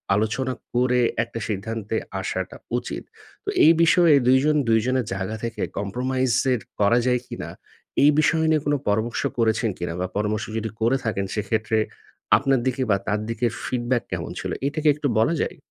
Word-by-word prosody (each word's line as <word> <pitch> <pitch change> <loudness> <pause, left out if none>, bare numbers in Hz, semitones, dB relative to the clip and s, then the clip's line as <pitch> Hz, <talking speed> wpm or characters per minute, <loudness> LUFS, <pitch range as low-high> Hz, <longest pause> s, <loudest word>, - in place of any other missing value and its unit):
আলোচনা 115 +5 0 0.2
করে 125 0 +2 0.2
একটা 115 0 -7
সিদ্ধান্তে 110 +1 -3 0.3
আসাটা 95 0 -4 0.2
উচিত। - - -5 0.4
তো - - -2 0.2
এই 160 - +9
বিষয়ে 165 0 +5
২ 130 +1 +6
জন 150 0 +3
২ 115 0 +5
জনের 130 -1 +1
জায়গা 100 +3 -3
থেকে 115 -1 -4 0.2
compromise 125 +4 0 0.2
এর 120 - -1 0.2
করা 105 +3 +4
যায় 125 -1 +3
কিনা, - - -6 0.5
এই 145 - +8
বিষয় 160 +1 +3
নিয়ে 155 -1 +3
কোনো 145 0 +2
পরামর্শ 110 +3 0 0.2
করেছেন 115 0 +2
কিনা 85 -1 -3
বা 90 - -1
পরামর্শ 105 +1 -1
যদি 110 0 -2
করে 120 +4 +3
থাকেন 100 -3 -1
সেক্ষেত্রে 110 +1 0 0.6
আপনার 135 -2 +2
দিকে 130 +1 -1
বা 100 - +4
তার 105 0 +1
দিকের 115 0 0
feedback 120 -1 0
কেমন - - -3
ছিল? - - -4 0.2
এটা 145 +2 -3
কি - - +2
একটু 150 -1 -2
বলা 115 +9 +3
যায়? - - -3
115 Hz, 175 wpm, -23 LUFS, 105-130 Hz, 0.6 s, এই